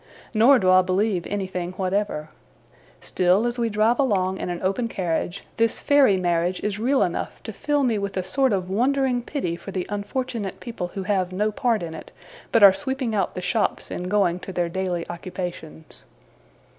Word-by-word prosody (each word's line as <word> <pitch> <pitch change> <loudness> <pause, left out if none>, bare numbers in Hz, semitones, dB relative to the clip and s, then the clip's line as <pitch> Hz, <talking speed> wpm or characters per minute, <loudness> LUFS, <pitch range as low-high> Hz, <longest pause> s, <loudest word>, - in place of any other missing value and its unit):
Nor 240 +5 +6
do 185 -5 +3
I 185 0 +7
believe 185 0 0
anything 185 -3 -3
whatever. 185 -4 -2 0.7
Still, 185 +5 +2
as 240 0 -2
we 230 -1 +1
drive 220 +4 +2
along 190 -8 +1
in - - -3
an 175 -1 -3
open 195 +6 0
carriage, 180 -3 -2
this 230 -1 +2
fairy 280 -9 +4
marriage 175 0 0
is 210 0 -2
real 260 +4 +2
enough - - -3
to - - -6
fill 290 -1 0
me 230 -5 +1
with 200 -1 -4
a 185 - 0
sort 260 +8 +1
of 185 -3 -1
wondering 250 +5 +1
pity 235 - -3
for 175 - -10
the 185 -2 -3
unfortunate 205 0 -3
people 230 -7 -5
who 195 - -3
have 185 -2 0
no 210 +4 0
part 225 -2 0
in 165 -1 -5
it, 160 - -9 0.4
but 230 - +4
are 195 -1 +10
sweeping 265 0 -3
out 200 -3 -1
the 180 - -4
shops, 190 +4 -1
and 180 +1 -4
going 185 -4 +2
to 190 - -8
their 175 -2 -1
daily 180 -1 -2
occupations. 175 -3 -7
195 Hz, 185 wpm, -24 LUFS, 180-230 Hz, 0.7 s, are